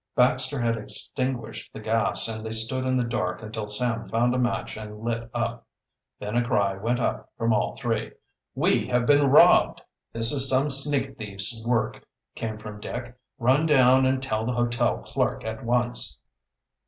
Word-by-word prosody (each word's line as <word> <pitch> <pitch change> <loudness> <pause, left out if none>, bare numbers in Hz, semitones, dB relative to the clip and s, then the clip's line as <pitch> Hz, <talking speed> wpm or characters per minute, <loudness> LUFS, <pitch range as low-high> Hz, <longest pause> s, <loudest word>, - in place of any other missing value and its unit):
Baxter 130 +2 +1
had 115 -1 0
extinguished 120 +1 -3
the - - -9
gas 110 +2 -1
and 110 -1 -6
they 110 - -5
stood 125 +4 -1
in 130 0 +1
the 125 - +1
dark 110 -5 -3
until 110 0 -6
Sam 115 +2 -1
found 120 +2 +1
a 130 - -1
match 120 -1 -2
and 105 0 -9
lit 115 0 -3
up. - - -4 0.5
Then 105 +2 -5
a 120 - +2
cry 100 -5 0
went 115 +5 -2
up 120 - -3
from 115 0 +1
all 105 - -1
three: 115 -4 -3 0.4
"We - - +1
have 125 -1 0
been 145 +1 +4
robbed!" 140 - +5 0.3
"This 115 0 +6
is 135 -2 +5
some 135 +3 +2
sneak 135 -1 +3
thief's 105 +2 +2
work," 120 -2 -1 0.3
came 110 -1 -5
from 105 -1 -9
Dick. 120 +3 -7 0.2
"Run 135 +5 +2
down 130 -3 +5
and 130 0 0
tell 110 -4 -2
the 125 +2 -2
hotel 120 -1 0
clerk - - -2
at 110 0 -6
once." 120 +1 0
120 Hz, 175 wpm, -25 LUFS, 110-130 Hz, 0.5 s, This